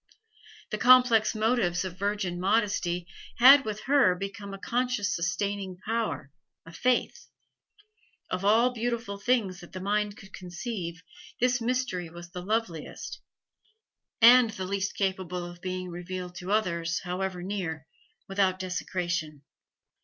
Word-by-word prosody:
The 215 Hz, -, -2 dB
complex 245 Hz, -3 st, +6 dB
motives 215 Hz, -5 st, +1 dB
of 180 Hz, -2 st, -5 dB
virgin 200 Hz, -3 st, -1 dB
modesty 190 Hz, -3 st, +1 dB, 0.3 s
had 270 Hz, +3 st, +8 dB
with 215 Hz, -1 st, -4 dB
her 270 Hz, -10 st, +4 dB
become 200 Hz, +2 st, -6 dB
a 195 Hz, -, -6 dB
conscious 240 Hz, -1 st, -1 dB
sustaining 185 Hz, +2 st, -2 dB
power, 220 Hz, -, -3 dB, 0.3 s
a 165 Hz, -, -12 dB
faith; 250 Hz, +8 st, 0 dB, 1.0 s
of 185 Hz, +1 st, -3 dB
all 225 Hz, +5 st, +4 dB
beautiful 235 Hz, -3 st, -3 dB
things 200 Hz, -5 st, +1 dB
that 175 Hz, -, -13 dB
the 185 Hz, -, -5 dB
mind 205 Hz, +2 st, -1 dB
could 195 Hz, -5 st, -14 dB
conceive, 175 Hz, -2 st, -6 dB, 0.4 s
this 245 Hz, 0 st, +2 dB
mystery 230 Hz, -8 st, -1 dB
was 170 Hz, +1 st, -11 dB
the 180 Hz, -, -6 dB
loveliest, 190 Hz, -5 st, -3 dB, 1.0 s
and 240 Hz, 0 st, +8 dB
the 200 Hz, -4 st, -5 dB
least 200 Hz, +1 st, -2 dB
capable 185 Hz, -2 st, -2 dB
of 175 Hz, 0 st, -10 dB
being 185 Hz, -1 st, -4 dB
revealed 180 Hz, +1 st, -6 dB
to 180 Hz, +2 st, -5 dB
others, 170 Hz, -6 st, 0 dB
however 180 Hz, 0 st, -3 dB
near, 175 Hz, -5 st, -4 dB, 0.4 s
without 195 Hz, -1 st, +1 dB
desecration. 175 Hz, -5 st, -3 dB
195 Hz, 130 wpm, -28 LUFS, 180-225 Hz, 1.0 s, had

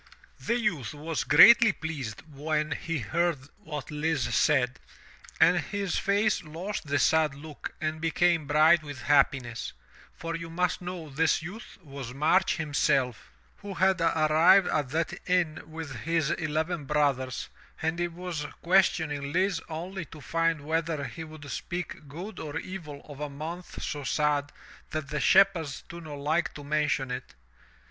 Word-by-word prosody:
The 235 Hz, -, 0 dB
youth 165 Hz, -, -1 dB
was 155 Hz, +2 st, -3 dB
greatly 220 Hz, +8 st, +8 dB
pleased 145 Hz, -, -6 dB
when 150 Hz, +1 st, -1 dB
he 165 Hz, +2 st, -2 dB
heard 170 Hz, +7 st, 0 dB, 0.2 s
what 150 Hz, -9 st, -7 dB
Lise 155 Hz, +1 st, -1 dB
said, 130 Hz, -5 st, +2 dB, 0.6 s
and 180 Hz, -, +6 dB
his 200 Hz, 0 st, -2 dB
face 200 Hz, +1 st, +2 dB
lost 170 Hz, +3 st, -5 dB
the 145 Hz, 0 st, +1 dB
sad 155 Hz, +1 st, +3 dB
look 150 Hz, +1 st, -8 dB
and 155 Hz, 0 st, -2 dB
became 165 Hz, -1 st, +2 dB
bright 155 Hz, +3 st, +5 dB
with 145 Hz, -3 st, -8 dB
hap 145 Hz, 0 st, +5 dB
piness, 120 Hz, -3 st, -6 dB, 0.4 s
for 165 Hz, 0 st, -4 dB
you 165 Hz, 0 st, -6 dB
must 180 Hz, +2 st, 0 dB
know 175 Hz, -2 st, -6 dB
this 160 Hz, +3 st, +1 dB
youth 200 Hz, +8 st, -9 dB
was 135 Hz, -4 st, -8 dB
March 165 Hz, +7 st, +3 dB
himself, 140 Hz, -5 st, 0 dB, 0.3 s
who 200 Hz, -1 st, -8 dB
had 190 Hz, -1 st, +3 dB
arrived 165 Hz, +4 st, +5 dB
at 145 Hz, -4 st, 0 dB
that 160 Hz, +3 st, -1 dB, 0.2 s
inn 175 Hz, -4 st, +1 dB
with 160 Hz, -3 st, -7 dB
his 160 Hz, +2 st, 0 dB
eleven 155 Hz, 0 st, -1 dB
brothers, 135 Hz, -3 st, 0 dB, 0.3 s
and 160 Hz, +2 st, -1 dB
he 175 Hz, -, +1 dB
was 170 Hz, -3 st, -5 dB, 0.2 s
ques 185 Hz, +2 st, +5 dB
tioning 145 Hz, -3 st, -4 dB
Lise 185 Hz, -2 st, +2 dB
only 170 Hz, +3 st, -5 dB
to 160 Hz, -, -12 dB
find 165 Hz, +1 st, 0 dB
whether 160 Hz, 0 st, -1 dB
he 135 Hz, +6 st, -6 dB
would 155 Hz, -2 st, -11 dB
speak 175 Hz, 0 st, -5 dB
good 175 Hz, +10 st, -8 dB
or 150 Hz, 0 st, -5 dB
evil 165 Hz, -5 st, -7 dB
of 145 Hz, -2 st, -10 dB
a 150 Hz, 0 st, -3 dB
month 160 Hz, +5 st, -7 dB
so 145 Hz, -1 st, -3 dB
sad 145 Hz, 0 st, +1 dB, 0.4 s
that 155 Hz, -3 st, -4 dB
the 150 Hz, 0 st, -2 dB
shepherds 175 Hz, -4 st, +3 dB
do 170 Hz, 0 st, -9 dB
not 150 Hz, -3 st, -8 dB
like 155 Hz, +4 st, 0 dB
to 145 Hz, -, -8 dB
mention 145 Hz, -3 st, 0 dB
it. 125 Hz, -, -6 dB
155 Hz, 155 wpm, -28 LUFS, 145-175 Hz, 0.6 s, greatly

